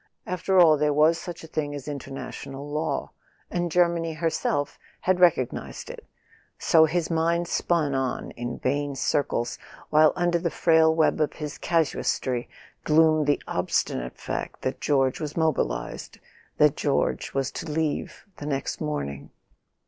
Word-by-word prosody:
After 185 +1 0
all, 155 -4 +6
there 150 -1 +2
was 160 +3 +4
such 175 -1 -8
a - - -9
thing 145 -2 -3
as 140 -1 -8
international 140 0 -7
law, 150 +2 -2 0.4
and 175 -1 -1
Germany 170 -1 +2
herself 155 -3 -1 0.2
had 185 0 +2
recog¬ 170 -9 +4
nized - - -7
it... - - -12 0.5
So 160 -1 +5
his 170 +1 -1
mind 170 +1 +1
spun 165 -5 +1
on 135 -2 -2
in 120 0 -5
vain 145 +1 -1
circles, 125 -3 -1 0.3
while 155 0 +6
under 175 -1 +1
the 170 0 -1
frail 160 -1 +4
web 155 -1 +2
of 150 - +1
his 150 -2 -6
casuistry 135 -6 0 0.3
gloomed 155 -1 +4
the 145 - +1
ob¬ - - -2
stinate 60 +1 -1
fact - - -5
that - - -3
George 135 -3 +2
was 150 0 -5
mobilised, 155 - -1 0.4
that - - +5
George 65 - -1
was 135 -1 0
to 155 - -6
leave 155 -1 -2
the 145 - -6
next 135 -2 -3
morning. 70 - -4
155 Hz, 150 wpm, -26 LUFS, 140-165 Hz, 0.5 s, all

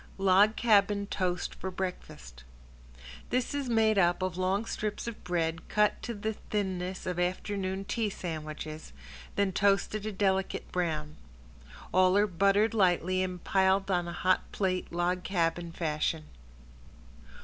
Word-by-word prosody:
~LOG 195 +3 +5
CABIN 205 -3 +3
TOAST 180 -2 -1
FOR 190 - -5
BREAKFAST~ 120 - -6 0.9
This 250 +3 0
is 280 -3 -2
made 220 -2 +3
up 175 0 +2
of 185 -2 -2
long 190 +4 0
strips 210 -2 -3
of 235 -2 -7
bread 165 -2 -2
cut 210 0 +2
to 235 - -4
the 220 +2 -2
thinness 190 -3 -3
of 180 -1 -2
afternoon 190 +1 -2
tea 220 +1 -1
sandwiches, 155 -3 -6 0.4
then 200 -1 +2
toasted 200 +2 +1
a - - -2
delicate 190 -1 -1
brown. 155 -4 -2 0.8
All 185 +1 +5
are - - +6
lightly 210 - -1
buttered 200 +4 +3 0.3
and 185 -1 -1
piled 195 0 +2
on 175 -1 +1
a - - -4
hot 185 +2 +1
plate 185 -2 -1
log 175 +1 0
cabin 170 -2 -1
fashion. 155 -1 -1
185 Hz, 140 wpm, -30 LUFS, 175-205 Hz, 0.9 s, are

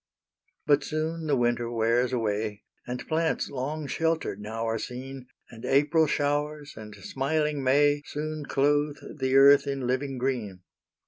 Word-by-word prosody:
But 145 -1 +4
soon 160 +1 -3
the 145 - +3
winter 120 -1 +1
wears 120 +2 +1
away, 105 -3 -2 0.2
And 125 0 -5
plants 160 0 0
long 145 +3 -3
sheltered 160 -8 -1
now 110 +2 -4
are 115 0 -1
seen, 130 +2 -7 0.2
And 115 -1 -12
April 150 +4 +3
showers 145 +1 -1
and 105 -1 -10
smiling 145 +7 -1
May 145 +2 +3
Soon 155 0 -4
clothe 145 +1 +1 0.2
the 130 0 +1
earth 140 +1 +7
in 135 -2 -2
living 130 +2 -1
green. 120 -8 -2
135 Hz, 140 wpm, -27 LUFS, 120-150 Hz, 0.2 s, earth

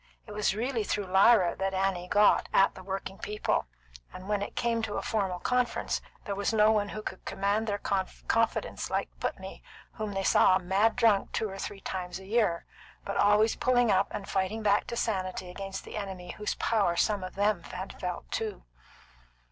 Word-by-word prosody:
It 210 - -11
was 210 -1 0
really 235 0 -1
through 205 0 -2
Lyra 190 0 +5
that 195 0 -1
Annie 190 -2 0
got 205 +2 +4
at 195 - +4
the - - -11
working 195 0 -5
people, 210 - -1 0.4
and 185 +1 -10
when 205 -1 0
it 205 - -5
came 235 -1 0
to 220 -2 -3
a - - -1
formal 195 -5 -1
conference, 250 +5 0 0.2
there 200 - -2
was 200 +2 -1
no 215 -1 +5
one 205 -2 +1
who 215 +1 -6
could 190 - -6
command 200 +3 -1
their 205 -1 0
confidence 205 +3 -1
like - - -1
Putney, - - -5 0.3
whom 215 -2 -5
they 195 0 -1
saw 185 - +5
mad 195 +4 +2
drunk 215 -4 +3
two 220 - 0
or 195 - -8
three 195 0 -6
times 180 -2 -4
a 190 - -11
year, 205 -5 +1 0.4
but - - -3
always 210 +2 +4
pulling 245 -3 +3
up 195 0 +3
and 205 -2 -6
fighting 195 +3 -1
back 205 0 +3
to 235 - -4
sanity 185 -4 -2
against 195 +1 -6
the - - -8
enemy 190 -3 -5
whose 210 - -3
power 205 -7 +1
some 205 +2 +1
of 185 - -7
them 205 -2 +1
had 185 +2 -7
felt 180 -1 -5
too. 215 -3 -3
200 Hz, 190 wpm, -29 LUFS, 190-215 Hz, 0.4 s, Lyra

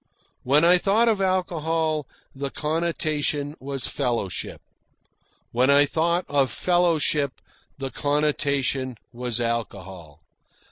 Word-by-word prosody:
When 145 +5 +3
I 180 +1 +6
thought 210 +6 +3
of 215 -4 +2
alcohol, 165 -5 0 0.3
the 140 +1 -3
connotation 150 -2 -1
was 135 -1 -4
fellowship. 120 - -2 0.9
When 125 +3 +2
I 140 +1 +6
thought 170 +4 0
of 140 -2 +2
fellowship, 160 -6 +1 0.4
the 135 -1 -5
connotation 140 -3 0 0.2
was 120 -1 -2
alcohol. 95 - -4
145 Hz, 100 wpm, -24 LUFS, 130-165 Hz, 0.9 s, I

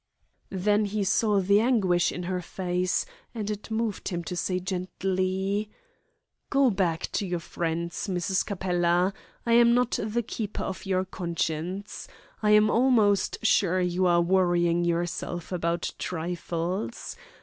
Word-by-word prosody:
Then 205 +2 +1
he 205 0 -1
saw 205 +2 +2
the 200 +2 +4
anguish 195 -8 +2
in 180 - -5
her 180 0 -2
face, 180 +1 -1 0.3
and 215 -2 -2
it 210 +1 -6
moved 220 -2 -2
him 175 -2 -3
to 180 - -5
say 180 +2 -1
gently: 190 +2 -1 0.8
"Go 275 -3 +4
back 175 -5 0
to 200 - -1
your 175 -1 -1
friends, 170 +1 -3
Mrs. 185 0 0
Capella. 180 -1 +1 0.3
I 230 - +2
am 235 0 +6
not 245 -1 +1
the 220 +3 -1
keeper 215 -2 -4
of 190 +1 -5
your 185 -1 +1
conscience. 175 +2 -3 0.3
I 210 - +2
am 210 0 +6
almost 225 -4 +3
sure 185 -4 +3
you 180 +1 +1
are 170 -1 +4
worrying 175 -1 +2
yourself 175 0 -2
about 170 -1 -1
trifles. 170 -5 -3
185 Hz, 140 wpm, -27 LUFS, 175-205 Hz, 0.8 s, am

